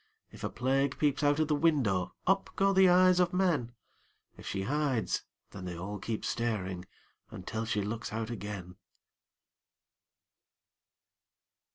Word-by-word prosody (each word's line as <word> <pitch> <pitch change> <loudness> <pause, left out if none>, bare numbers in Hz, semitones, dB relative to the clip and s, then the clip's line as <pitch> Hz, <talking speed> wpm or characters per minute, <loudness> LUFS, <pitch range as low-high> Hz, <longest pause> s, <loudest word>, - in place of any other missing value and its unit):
If - - -12
a - - -1
Plague 135 +2 0
peeps 145 -2 +1
out 145 0 +3
of 155 - +2
the 150 - +1
window, 135 - +1
Up 195 +1 +2
go 195 0 +3
the 190 -1 +6
eyes 180 0 +5
of 180 0 +2
men; 160 -11 +1 0.6
If - - -11
she 95 -1 -2
hides, 135 -1 0 0.3
then 95 - -8
they 90 -1 -5
all 100 +4 -5
keep 110 +2 -4
staring 95 -6 -2 0.4
Until 110 +5 -5
she 105 -2 -1
looks 110 +3 -4
out 110 +1 -3
again. 100 -5 -6
120 Hz, 140 wpm, -31 LUFS, 100-155 Hz, 0.6 s, the